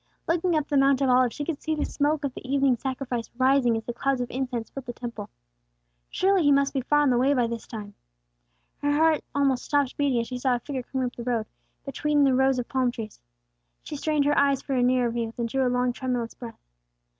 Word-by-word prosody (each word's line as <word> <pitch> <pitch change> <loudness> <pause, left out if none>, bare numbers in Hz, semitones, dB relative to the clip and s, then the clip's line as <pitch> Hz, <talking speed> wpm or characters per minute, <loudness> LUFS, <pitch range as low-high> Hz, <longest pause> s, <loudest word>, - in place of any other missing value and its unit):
Looking 340 +1 +1
up 305 -2 0
the 290 - +1
Mount 275 -1 +4
of 270 - +2
Olives, 250 -1 +3
she 290 - -4
could 315 -3 -4
see 315 0 -1
the 300 - -1
smoke 295 +1 0
of 275 -3 -2
the - - -9
evening 270 0 +2
sacrifice 255 -1 -4
rising 260 -3 +3
as 225 - -5
the 240 - -5
clouds 270 +2 0
of 245 -1 -3
incense 250 -3 -3
filled 270 -2 -8
the 240 - -4
Temple. 240 -1 -7 0.8
Surely 390 0 +2
he 290 -2 +4
must 280 0 +3
be 270 - 0
far 295 +4 +2
on 285 -3 +3
the 240 - +2
way 275 +3 +3
by 245 -2 +2
this 230 -1 -5
time. 210 -3 -8 0.9
Her 290 - +1
heart 315 0 +3
almost 275 -3 +2
stopped 285 -3 0
beating 280 -4 +1
as 230 - -1
she 250 +1 -6
saw 255 -1 +2
a - - -2
figure 265 +1 -5
coming 260 +1 -3
up 245 - -5
the - - -7
road, 235 -3 -1 0.4
between 290 +1 +1
the 270 -1 +4
rows 265 0 +3
of 245 - -3
palm 260 -2 +1
trees. 225 -3 -7 0.6
She - - -7
strained 295 0 0
her 290 0 +3
eyes 280 -1 +2
for 275 - -3
a 255 - +2
nearer 245 -1 +2
view, 230 -1 -3
then 235 - -1
drew 260 +3 0
a - - +2
long 250 0 +1
tremulous 245 -2 -3
breath. 235 -2 -10
260 Hz, 240 wpm, -26 LUFS, 245-285 Hz, 0.9 s, Mount